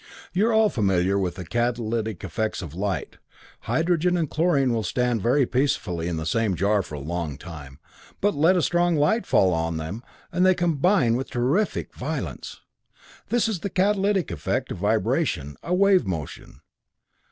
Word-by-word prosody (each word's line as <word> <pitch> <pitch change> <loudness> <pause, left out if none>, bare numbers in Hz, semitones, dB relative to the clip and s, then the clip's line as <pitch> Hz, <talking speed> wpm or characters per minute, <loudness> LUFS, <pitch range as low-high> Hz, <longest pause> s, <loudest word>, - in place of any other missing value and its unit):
You're 210 +6 +2
all 220 -1 +4
familiar 95 - +1
with 90 -3 -2
the 90 -1 -7
catalytic 115 -1 -2
effects 110 -3 -3
of 80 -4 -8
light. 95 +2 -3 0.5
Hydrogen 175 +2 +1
and 165 -2 0
chlorine 145 -6 +2
will 115 - 0
stand 120 +2 0
very 130 +6 +3
peacefully 95 - -1
in 85 -2 -2
the 80 - -4
same 105 +2 +1
jar 100 +3 +2
for 75 - -8
a - - -5
long 80 -1 -4
time, 70 -5 -10 0.4
but 205 +1 +2
let 165 +5 +3
a 175 - +1
strong 175 -1 +2
light 155 +11 +1
fall 95 -2 +4
on 80 0 -1
them, 80 +8 -5 0.3
and 180 +1 +1
they 185 0 +5
combine 170 - +2
with 135 - -4
terrific 135 - 0
violence. - - -5 0.7
This 240 -1 +2
is 215 -6 -2
the 200 - -4
catalytic 195 - +1
effect 75 -4 -2
of - - -5
a - - -1
vibration, 70 +1 0
a 180 - -1
wave 195 - +4
motion. 80 -6 -6
120 Hz, 170 wpm, -24 LUFS, -, 0.7 s, they